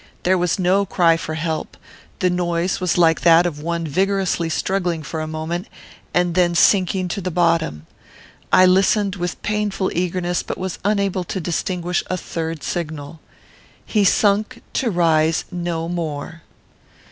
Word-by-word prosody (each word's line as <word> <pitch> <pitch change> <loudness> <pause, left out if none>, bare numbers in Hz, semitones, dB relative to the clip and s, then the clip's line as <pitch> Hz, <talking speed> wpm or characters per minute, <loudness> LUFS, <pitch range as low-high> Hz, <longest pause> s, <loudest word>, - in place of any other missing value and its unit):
There 185 +1 +3
was 175 -1 +1
no 190 +2 +2
cry 175 -3 +3
for 160 -1 -4
help. 160 0 -3 0.4
The 180 -1 +3
noise 175 0 -1
was 180 -2 +1
like 165 -2 +4
that 170 0 +6
of 155 -4 -3
one 170 +1 -2
vigorously 190 +1 0
struggling 175 -1 -1
for 160 +2 -4
a 155 - -4
moment, 160 +3 -4 0.4
and 175 -1 +1
then 175 -1 +2
sinking 185 0 +3
to 200 - -3
the 185 - -2
bottom. 165 - +1 0.7
I 185 - +7
listened 195 +2 +3
with 175 -1 -3
painful 205 -2 -1
eagerness, 175 0 -1
but - - -5
was 185 -1 -4
unable 200 -2 0
to 190 - -4
distinguish 175 +1 -2
a 185 - -2
third 165 -3 -5
signal. 155 -2 -5 0.7
He 210 -2 +1
sunk 210 +5 +2
to 250 - 0
rise 165 -3 +2
no 170 -2 -3
more. 165 -2 -4
175 Hz, 150 wpm, -20 LUFS, 165-185 Hz, 0.7 s, I